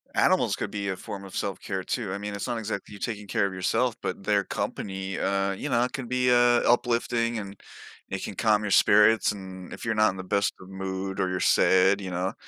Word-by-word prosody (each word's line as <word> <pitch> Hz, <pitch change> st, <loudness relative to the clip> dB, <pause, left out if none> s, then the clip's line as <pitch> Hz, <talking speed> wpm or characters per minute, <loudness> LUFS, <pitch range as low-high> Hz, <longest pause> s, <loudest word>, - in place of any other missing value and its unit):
Animals -, -, +3 dB
could -, -, -4 dB
be 100 Hz, -1 st, -3 dB
a 95 Hz, -, -1 dB
form 100 Hz, +1 st, -8 dB
of 95 Hz, -, -10 dB
self-care 95 Hz, -1 st, -3 dB
too. 100 Hz, -2 st, -3 dB
I -, -, -2 dB
mean, 105 Hz, 0 st, -5 dB
it's 100 Hz, -, -4 dB
not 120 Hz, -2 st, -2 dB
exactly 110 Hz, -1 st, -5 dB
you 100 Hz, -, -10 dB
taking 105 Hz, -3 st, -4 dB
care 100 Hz, -, +1 dB
of 95 Hz, -, -7 dB
yourself, 115 Hz, +6 st, 0 dB
but -, -, -4 dB
their -, -, +2 dB
company, 95 Hz, -1 st, -4 dB
uh, 100 Hz, 0 st, 0 dB
you 125 Hz, +9 st, -5 dB
know, 120 Hz, -2 st, +3 dB
it 125 Hz, -, -3 dB
can 130 Hz, -3 st, -5 dB
be, 125 Hz, 0 st, +1 dB
uh, 120 Hz, 0 st, +5 dB
uplifting 120 Hz, -1 st, +1 dB
and 100 Hz, -1 st, -8 dB, 0.5 s
it -, -, -4 dB
can -, -, -5 dB
calm 105 Hz, -1 st, +2 dB
your 105 Hz, -, -2 dB
spirits, 105 Hz, +3 st, +5 dB
and 95 Hz, -2 st, -9 dB
if -, -, -8 dB
you're 110 Hz, -1 st, 0 dB
not 110 Hz, -2 st, +4 dB
in 95 Hz, -, -10 dB
the 95 Hz, -, -5 dB
best 100 Hz, +2 st, 0 dB
of 95 Hz, -, -12 dB
mood 95 Hz, 0 st, -4 dB
or 95 Hz, -, +1 dB
you're 90 Hz, 0 st, -2 dB
sad, 95 Hz, +2 st, +4 dB
you 95 Hz, -2 st, -6 dB
know, 90 Hz, +3 st, -2 dB
100 Hz, 235 wpm, -26 LUFS, 95-115 Hz, 0.5 s, uh